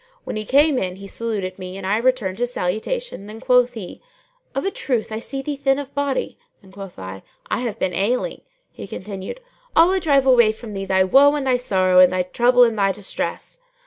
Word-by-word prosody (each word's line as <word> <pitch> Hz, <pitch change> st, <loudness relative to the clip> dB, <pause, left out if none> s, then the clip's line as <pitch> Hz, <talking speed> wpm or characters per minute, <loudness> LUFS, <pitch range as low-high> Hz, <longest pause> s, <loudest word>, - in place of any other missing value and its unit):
When -, -, -5 dB
he 215 Hz, 0 st, -3 dB
came 285 Hz, +2 st, +4 dB
in 185 Hz, -1 st, -3 dB
he 195 Hz, +1 st, -11 dB
saluted 200 Hz, -3 st, -4 dB
me 185 Hz, +1 st, -7 dB
and 195 Hz, -, -7 dB
I 200 Hz, +3 st, +1 dB
returned 230 Hz, -5 st, 0 dB
his 245 Hz, 0 st, -1 dB
salutation; 220 Hz, -, -3 dB
then 215 Hz, +1 st, -9 dB
quoth 250 Hz, -1 st, +3 dB
he, 200 Hz, -6 st, -8 dB, 0.5 s
"Of 275 Hz, -, -2 dB
a 390 Hz, -, 0 dB
truth 240 Hz, -, -2 dB
I 220 Hz, -, -3 dB
see 270 Hz, +3 st, -5 dB
thee 290 Hz, +1 st, -3 dB
thin 270 Hz, -1 st, +1 dB
of 285 Hz, -1 st, -7 dB
body;" 285 Hz, -2 st, -2 dB, 0.2 s
and 190 Hz, -1 st, -18 dB
quoth 195 Hz, -1 st, -10 dB
I, 95 Hz, 0 st, -8 dB, 0.3 s
"I -, -, +1 dB
have 240 Hz, -4 st, -3 dB
been 180 Hz, -, -1 dB
ailing." 245 Hz, -, -1 dB, 0.3 s
He -, -, -9 dB
continued, 195 Hz, -, -7 dB, 0.3 s
"Allah 360 Hz, +4 st, +5 dB
drive 285 Hz, -6 st, +3 dB
far 265 Hz, -1 st, +5 dB
away 235 Hz, -3 st, +5 dB
from 220 Hz, -1 st, -10 dB
thee 195 Hz, 0 st, -4 dB
thy 190 Hz, 0 st, +3 dB
woe 280 Hz, +10 st, +5 dB
and 285 Hz, -2 st, -2 dB
thy 255 Hz, -1 st, +3 dB
sorrow 185 Hz, -6 st, +2 dB
and 185 Hz, -1 st, +7 dB
thy 185 Hz, 0 st, 0 dB
trouble 245 Hz, +7 st, +4 dB
and 230 Hz, -3 st, +1 dB
thy 195 Hz, -1 st, +3 dB
distress." 200 Hz, -, -5 dB
225 Hz, 215 wpm, -21 LUFS, 190-270 Hz, 0.5 s, and